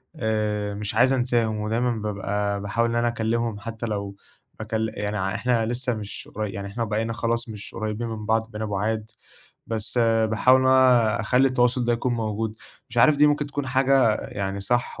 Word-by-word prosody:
آآ، 105 -2 -1
مش 100 0 -4
عايز 130 +2 +4
أنساهم 120 -4 +1
ودايمًا 115 +3 0
بابقى 105 -2 -2
باحاول 115 +4 0
إن 115 - -2
أنا 120 0 +2
أكلّمهم 115 -1 -1
حتّى 115 +2 -6
لو 100 -3 -4 0.5
هكل 110 0 -2
يعني 105 +1 -2 0.2
إحنا 120 -3 +1
لسه 125 +1 -1
مش 105 -2 -7
قري 105 -1 -2
يعني 100 +1 -6
إحنا 115 +4 -3
وبقينا 110 +1 -1
خلاص 115 0 -1
مش 105 -2 -8
قريّبين 110 +2 -3
من 110 -1 -6
بعض 110 +1 +1
بقينا 110 +1 -4
بُعاد، 110 +2 -2 0.6
بس 115 +2 -1
باحاول 115 +2 +4
إن 130 - +1
أنا 125 -4 +4
أخلّي 125 +4 +3
التواصل 125 0 +2
ده 120 - +2
يكون 120 +1 0
موجود، 110 -1 -2 0.4
مش 120 - -3
عارف 150 +5 +6
دي 150 +1 +6
ممكن 145 0 +1
تكون 145 -1 -4
حاجة 130 -3 +3
يعني 100 0 -4
صح 120 +3 -1
115 Hz, 180 wpm, -24 LUFS, 105-120 Hz, 0.6 s, عارف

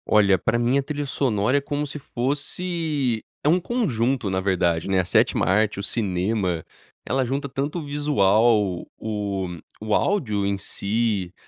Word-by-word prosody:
Olha, 100 -3 +4
pra 110 +6 0
mim 120 +3 +2
a - - -1
trilha 145 +1 -3
sonora 125 -2 +1
é - - +1
como 145 +1 -2
se 150 +1 -6
fosse 145 -1 -1 0.2
é 150 - +3
um 175 +3 +4
conjunto 135 - 0
na 95 0 0
verdade, 85 -4 +1
né, 95 -1 +2
a 90 - +1
sétima 85 - +2
arte, 105 +3 +2
o - - -4
cinema 95 -4 0 0.4
ela 130 0 +1
junta 135 +3 -2
tanto 140 +5 -3
o 155 - -7
visual 110 -9 +2
o 100 -3 -3 0.3
o 110 0 -2
áudio 105 - +1
em 100 0 0
si, 100 -2 -1
115 Hz, 160 wpm, -24 LUFS, 100-140 Hz, 0.4 s, Olha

